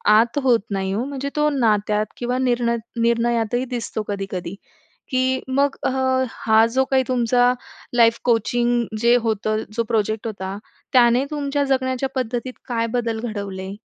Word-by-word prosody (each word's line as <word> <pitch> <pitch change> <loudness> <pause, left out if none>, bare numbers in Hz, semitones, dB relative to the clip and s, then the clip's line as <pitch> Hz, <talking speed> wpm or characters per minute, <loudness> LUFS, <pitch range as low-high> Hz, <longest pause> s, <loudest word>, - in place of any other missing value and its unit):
आत 230 +6 +3
होत 245 -3 +4
नाही 190 -1 -1
हो. 220 - -1
म्हणजे 280 0 -4
तो 300 0 +3
नात्यात 210 -2 +2
किंवा 250 +1 -1
निर्ण 240 -1 +1 0.3
निर्णयातही 235 +1 +1
दिसतो 230 -2 -3
कधी-कधी. 195 -2 -4 0.6
की 260 0 +1
मग 275 +1 +1
अ, - - +2 0.4
हा 220 0 +3
जो 265 - +3
काही 265 -1 +4
तुमचा 245 0 +3 0.4
लाईफ 230 -1 +5
कोचिंग 240 +1 +2 0.2
जे 235 +1 +5
होतं, 220 -2 -1
जो 230 - +2
प्रोजेक्ट 220 -1 0
होता, 195 -3 -5 0.4
त्याने 245 +1 +5
तुमच्या 285 -1 -1
जगण्याच्या 260 -1 0
पद्धतीत 250 0 -2 0.2
काय 230 -1 0
बदल 225 -1 -3
घडवले? 195 -2 -5
235 Hz, 145 wpm, -22 LUFS, 220-255 Hz, 0.6 s, लाईफ